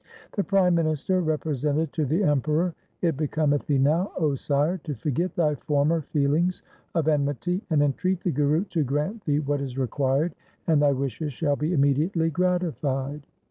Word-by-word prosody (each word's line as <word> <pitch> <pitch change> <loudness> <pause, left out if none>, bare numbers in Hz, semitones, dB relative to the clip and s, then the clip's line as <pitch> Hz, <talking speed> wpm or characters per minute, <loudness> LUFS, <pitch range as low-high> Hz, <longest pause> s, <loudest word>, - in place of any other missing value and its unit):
2 - - -17
The 200 - +2
prime 190 -3 +3
minister 165 +2 +1
represented 150 -1 -1
to 155 - 0
the 165 +9 +1
Emperor, 155 +3 +1 0.2
' - - -44
It 165 -3 +2
becometh 150 -1 0
thee 145 - +2
now, 155 +8 +2
O 155 -5 +1
sire, 145 +6 0
to 150 -2 -5
forget 150 +9 -2
thy 155 -3 +2
former 150 +3 +1
feelings 150 +5 0 0.3
of 160 -3 +1
enmity, 150 - 0
and 150 -3 +3
entreat 180 +6 0
the 180 - 0
Guru 150 +4 +2
to 175 -6 -1
grant 150 - -2
thee 150 -1 +1
what 145 -1 -1
is 135 -2 -5
required 135 +5 0 0.3
and 155 -3 +3
thy 145 -1 +4
wishes 140 +2 -3
shall 145 +2 0
be 150 +3 -2
imme 140 0 +4
diately 165 +1 0
gratified. 150 -6 -1
150 Hz, 180 wpm, -25 LUFS, 140-170 Hz, 0.3 s, thy